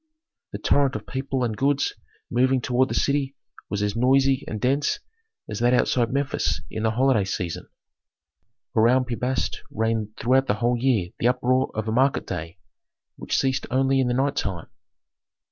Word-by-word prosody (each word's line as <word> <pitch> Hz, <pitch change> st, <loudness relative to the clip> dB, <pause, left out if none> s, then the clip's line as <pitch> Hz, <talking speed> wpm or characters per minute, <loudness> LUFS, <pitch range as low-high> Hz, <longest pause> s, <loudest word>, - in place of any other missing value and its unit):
The -, -, -4 dB
torrent 140 Hz, -2 st, +2 dB
of -, -, -5 dB
people 135 Hz, -1 st, -2 dB
and 115 Hz, -3 st, -1 dB
goods 140 Hz, +3 st, +1 dB, 0.4 s
moving 130 Hz, +2 st, +3 dB
toward 125 Hz, +2 st, +1 dB
the -, -, -2 dB
city 140 Hz, -1 st, 0 dB, 0.3 s
was 105 Hz, 0 st, -2 dB
as 105 Hz, -1 st, -1 dB
noisy 135 Hz, +2 st, +3 dB
and 110 Hz, -, -4 dB
dense 140 Hz, +5 st, +1 dB, 0.5 s
as -, -, -5 dB
that 120 Hz, +1 st, +3 dB
outside 120 Hz, -1 st, +1 dB
Memphis 140 Hz, +1 st, 0 dB
in 110 Hz, -, -4 dB
the 110 Hz, -, +2 dB
holiday 125 Hz, -1 st, +2 dB
season. 90 Hz, -3 st, -4 dB, 1.1 s
Around 125 Hz, +4 st, +4 dB
Pi 125 Hz, -, -4 dB
Bast 125 Hz, +3 st, -2 dB
reigned 110 Hz, -1 st, -2 dB
throughout 130 Hz, +3 st, +2 dB
the 105 Hz, -, +2 dB
whole 120 Hz, +3 st, +1 dB
year 115 Hz, -8 st, +1 dB
the 120 Hz, -, +2 dB
uproar 130 Hz, +1 st, +2 dB
of 110 Hz, 0 st, -3 dB
a -, -, 0 dB
market 130 Hz, +4 st, +2 dB
day, 85 Hz, -2 st, -6 dB, 0.6 s
which -, -, -2 dB
ceased 135 Hz, -1 st, 0 dB
only 135 Hz, +1 st, +2 dB
in 130 Hz, -, +2 dB
the 120 Hz, -, 0 dB
night 135 Hz, +2 st, +1 dB
time. 90 Hz, -5 st, -3 dB
125 Hz, 170 wpm, -24 LUFS, 110-135 Hz, 1.1 s, Around